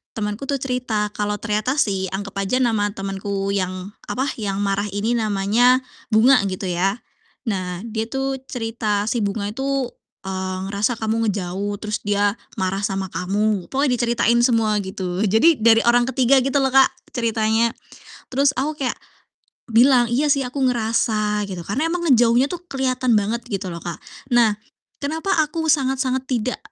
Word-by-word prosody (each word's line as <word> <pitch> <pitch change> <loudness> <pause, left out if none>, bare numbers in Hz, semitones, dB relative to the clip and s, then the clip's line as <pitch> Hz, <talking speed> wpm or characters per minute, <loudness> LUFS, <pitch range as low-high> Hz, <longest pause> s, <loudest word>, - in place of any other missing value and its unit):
temenku 210 +4 -3
tuh 280 - 0
cerita 245 -6 -1
kalau 210 0 -2
ternyata 215 +4 -1
si 195 -9 0
anggap 200 +1 -5
aja 195 +6 0
nama 220 -4 +1
temenku 195 0 -3
yang, 185 0 -3 0.2
apa, 265 +2 -1
yang 200 -2 -2
marah 200 +1 0
ini 205 +3 -1
namanya 220 +4 +3 0.2
Bunga, 240 +4 +5
gitu 185 0 -4
ya. 190 +5 0 0.5
Nah, 185 -5 -3
dia 220 -1 -3
tuh 270 +1 -2
cerita, 225 -4 -1
"Si 240 - 0
Bunga 205 0 -2
itu, 270 +1 -2 0.3
eee, 190 -1 -3
ngerasa 210 +4 0
kamu 225 +1 -1
ngejauh, 200 0 -2
terus 210 0 -2
dia 205 0 +1 0.2
marah 190 +1 -1
sama 195 -2 -2
kamu." 195 +3 -1
Pokoknya 265 -3 0
diceritain 235 0 +2
semua, 225 -3 +2
gitu. 190 -2 -4
Jadi, 230 - +4
dari 225 0 +5
orang 240 0 +4
ketiga 265 +1 +4
gitu 270 +2 0
loh, 265 - +1
Kak, 265 0 +7 0.2
ceritanya. 225 -1 +1 0.6
Terus 275 +1 +2
aku 295 +4 -2
kayak - - -2 0.8
bilang, 240 0 +5
"Iya 275 +5 +2
sih 275 -1 +3
aku 255 +3 -5
ngerasa." 220 -3 0
Gitu, 185 -3 -5
karena 275 +11 0
emang 345 +1 -2
ngejauhnya 240 +2 +4
tuh 350 - -4
kelihatan 255 -3 +1
banget 215 +3 0
gitu 195 -4 -3
loh, 170 - -7
Kak. 170 -1 -5 0.3
Nah, 235 -3 +4 0.5
kenapa 320 +7 -3
aku 315 +1 -1
sangat-sangat 265 -2 0
tidak 250 0 -1
225 Hz, 155 wpm, -21 LUFS, 200-255 Hz, 0.8 s, Kak